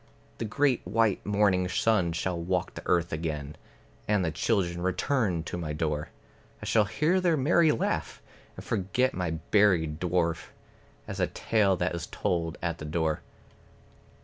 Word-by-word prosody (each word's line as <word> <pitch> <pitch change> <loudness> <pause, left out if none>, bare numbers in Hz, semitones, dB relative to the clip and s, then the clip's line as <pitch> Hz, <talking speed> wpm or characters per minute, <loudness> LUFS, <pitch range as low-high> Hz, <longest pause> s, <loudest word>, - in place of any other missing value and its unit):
The - - -2
great 135 +3 +1
white 105 +2 +1
morning 100 -3 +2
sun 95 -3 +2
shall 85 +1 -2
walk 90 +1 -1
the - - -7
earth 85 -1 +1
again, 75 -2 -3 0.5
And 105 -3 +2
the 80 - 0
children 85 0 0
return 95 - 0
to 85 - -5
my 75 -3 -3
door, 75 -1 -2 0.5
I - - -8
shall 110 -2 +3
hear 165 - +1
their 170 -3 +2
merry 155 +3 +4
laugh, 115 - -2 0.4
and - - -10
forget 105 +7 0
my 90 -2 -2
buried 80 -2 +2
dwarf, 85 -2 0 0.6
As - - -5
a - - +2
tale 105 -4 +1
that 90 0 -1
is 85 -2 -4
told 85 -2 -2
at 85 -1 -2
the 75 - -6
door. 80 0 -1
90 Hz, 155 wpm, -28 LUFS, 85-105 Hz, 0.6 s, merry